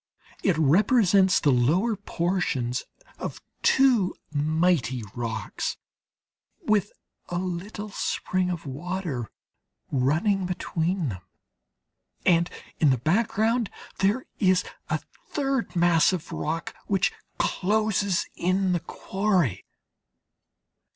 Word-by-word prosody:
It 185 -5 +2
represents 190 - +4
the 145 - +3
lower 165 - +3
portions 170 -10 -1 0.3
of - - -5 0.2
two 245 -9 +4 0.2
mighty 150 -5 +1
rocks, 115 -3 -3 0.9
with 210 -2 +2 0.4
a 175 - -2
little 185 +4 -4
spring 185 -2 -1
of 175 -3 -4
water 150 - -4 0.6
running 170 - +2
between 175 -2 -1
them, 95 -4 -6 1.0
and 170 -1 +4 0.3
in 155 - +5
the 130 - +3
background 220 - +1 0.3
there 205 +7 +2
is 185 -2 +4 0.3
a - - +1 0.3
third 270 -7 -1
mass 170 -1 +4
of 175 -4 -4
rock 160 +2 -3
which 195 -2 +2 0.2
closes 205 -2 +1
in 185 +1 +1
the 175 - +1
quarry. 185 - -1
180 Hz, 95 wpm, -26 LUFS, 155-200 Hz, 1.0 s, in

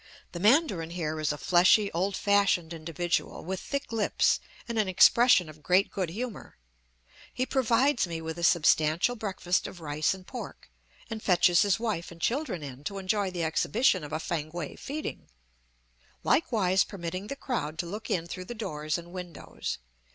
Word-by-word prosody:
The 175 - -6
mandarin 205 - +3
here 160 -3 -3
is 155 -1 0
a 150 - -4
fleshy, 185 +6 +4
old 190 +4 -1
fashioned 200 -5 +2
individual, 165 +1 -2
with 190 +1 -3
thick 280 +4 -4
lips 225 -2 +2 0.3
and 230 -2 -2
an 210 - +2
expression 215 +1 +6
of 155 0 -13
great 185 +5 +3
good 185 -5 -2
humor. 225 - -6 0.7
He 255 - -1
provides 260 -2 +2
me 165 -1 -4
with 160 +1 -5
a - - -5
substantial 165 +5 +3
breakfast 190 -5 -1
of 180 - -10
rice 155 +2 0
and 185 -1 -13
pork, 205 - -9 0.4
and 220 -1 -4
fetches 175 -2 +4
his 205 0 +2
wife 215 -7 -2
and 170 - -12
children 235 - -1
in 135 -1 -8
to 200 +3 -4
enjoy 195 +1 0
the 175 -2 -3
exhibition 185 - +2
of 150 - -8
a 155 - -2
Fankwae 160 -1 -4
feeding, 300 +2 -6 1.0
likewise 195 - +3
permitting 185 0 -6
the 275 - -4
crowd 160 - -3
to 175 - -2
look 205 +6 -6
in 170 -3 0
through 185 +2 -7
the 240 - -7
doors 155 -8 -3
and 170 0 -10
windows. 180 -2 -6
185 Hz, 170 wpm, -28 LUFS, 165-215 Hz, 1.0 s, expression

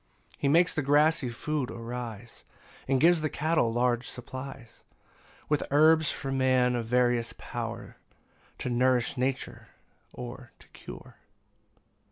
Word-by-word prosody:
10 - - -18
He - - 0
makes 170 +5 +4
the 155 - 0
grassy 145 0 +3
food 145 +2 -3
arise, 115 -1 -7 0.4
And 135 0 +2
gives 170 +2 +5
the 155 - 0
cattle 155 -6 +1
large 120 +1 0
supplies; 130 -1 -9 0.7
With 150 -1 +1
herbs 155 +2 +5
for 135 - -5
man 130 -2 +2
of 115 -2 -3
various 120 -1 +1
power, - - -6 0.6
To - - -4
nourish 125 0 +2
nature, 130 +1 -3 0.4
or 125 0 -9
to - - -19
cure. - - -12
130 Hz, 130 wpm, -28 LUFS, 120-145 Hz, 0.7 s, gives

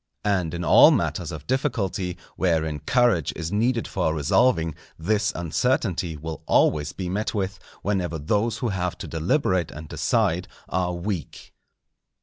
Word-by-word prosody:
And 90 -5 +1
in 85 - -3
all - - +8
matters - - 0
of - - -8
difficulty, 100 -9 -1 0.2
wherein 80 -4 0
courage 120 - +2
is 80 +1 -4
needed 115 +3 +1
for 80 -5 0
resolving, 80 - +2 0.2
this 105 +5 +1
uncertainty 90 - 0
will 80 0 -6
always 75 -1 +3
be 95 - -5
met 105 +5 -2
with, 100 -1 -2 0.2
whenever 90 -5 -1
those 105 +9 0
who 120 - -1
have 90 -3 -2
to - - -7
deliberate 90 - +1
and 80 +1 -9
decide - - 0 0.2
are 90 0 0
weak. 85 - -5
90 Hz, 140 wpm, -24 LUFS, 80-105 Hz, 0.2 s, all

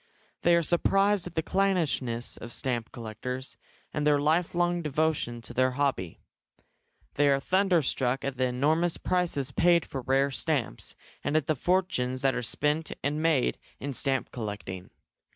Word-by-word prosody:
They 175 - +5
are 170 - +3
surprised 195 +3 +2
at 175 - -10
the 160 - 0
clannishness 160 -11 0
of 120 - -8
stamp 120 -2 -2
collectors, 125 +3 -6 0.4
and 150 - -1
their 145 -1 +5
lifelong 175 +3 +1
devotion 150 -6 -1
to - - -9
their 130 0 +2
hobby. 130 - -1 0.9
They 145 0 +3
are 135 0 +3
thunderstruck 155 -8 +1
at 140 -1 -2
the 130 - +2
enormous 155 +7 +2
prices 165 -7 0
paid 170 +3 +3
for 135 - -5
rare 135 +2 +2
stamps, 135 - -1 0.3
and 150 - +1
at 155 - 0
the 155 - +1
fortunes 130 -7 0
that 135 -1 +3
are - - -2
spent 150 +6 0
and 150 +2 0
made 160 -6 +2 0.2
in 140 0 -4
stamp 135 0 -1
collecting. 100 -5 -6
140 Hz, 150 wpm, -28 LUFS, 125-170 Hz, 0.9 s, They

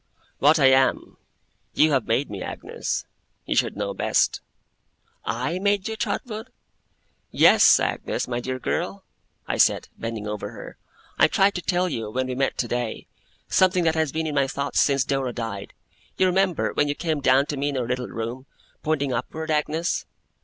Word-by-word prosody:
'What 150 +4 +5
I 140 - +4
am, 130 0 +2 0.6
you 155 0 +4
have 135 -4 +1
made 115 +2 0
me, 100 - -6
Agnes. - - -4 0.4
You - - -1
should - - +1
know - - -2
best.' - - +1 0.8
'I 170 +4 -2
made 200 0 +1
you, 220 - -3
Trotwood?' 220 +1 -4 0.8
'Yes! - - +6
Agnes, - - -2
my 120 -1 -2
dear 130 +1 -3
girl!' 185 +8 -3 0.4
I - - -1
said, - - +3
bending 115 -2 -4
over 105 -1 -4
her. - - -10 0.4
'I - - +7
tried 195 +1 +3
to 180 - -4
tell 180 +1 +1
you, 115 -10 -3
when 130 +4 -1
we 130 - -3
met 135 +1 -1
today, 120 -1 -2 0.4
something 185 -1 +3
that 160 -1 +3
has 160 -3 0
been 160 0 -2
in 155 - -2
my 140 -2 +2
thoughts 140 +1 -1
since 140 -2 +3
Dora 135 -3 -1
died. 115 -4 -5 0.5
You 190 - +4
remember, 185 -1 +1
when 145 - +2
you 145 - -1
came 160 -3 -2
down 135 +1 +4
to 145 - -4
me 140 +1 0
in 140 - -3
our 125 - -1
little 125 0 -2
room 120 +3 -5 0.3
pointing 145 -4 0
upward, 160 +6 -3
Agnes? 155 +3 -1
140 Hz, 175 wpm, -24 LUFS, 125-165 Hz, 0.8 s, I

